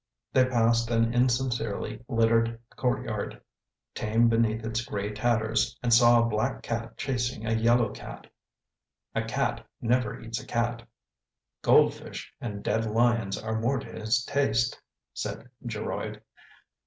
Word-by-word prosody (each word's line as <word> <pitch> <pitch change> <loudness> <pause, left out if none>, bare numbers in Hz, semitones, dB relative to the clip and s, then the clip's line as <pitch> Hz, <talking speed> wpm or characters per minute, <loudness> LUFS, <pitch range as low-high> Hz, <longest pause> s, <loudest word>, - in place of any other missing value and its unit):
They 130 -1 +5
passed 115 -2 +2
an 115 0 +2
insincerely 120 -3 0
littered 115 -1 +2 0.2
courtyard, 125 -1 -2 0.5
tame 115 +2 +2
beneath 115 -1 +1
its 115 +1 -1
gray 105 -2 -3
tatters, 115 +1 +1
and 120 -1 +3
saw 120 0 +7
a 115 - +3
black 115 +4 -1
cat 115 0 -4
chasing 125 -3 -2
a 115 - 0
yellow 115 0 +3
cat. - - -9 0.9
"A - - 0
cat - - -1 0.2
never 125 0 0
eats 115 0 -5
a - - -14
cat 120 0 -1 0.4
— - - -62
goldfish - - +2
and 105 -4 -5
dead 110 0 +1
lions 115 -2 +2
are 110 0 -2
more 130 +4 +1
to 135 - -5
his 115 +3 0
taste," 120 -5 +1 0.3
said 120 - -5 0.2
Geroid. 110 -2 -4
115 Hz, 135 wpm, -28 LUFS, 110-120 Hz, 0.9 s, saw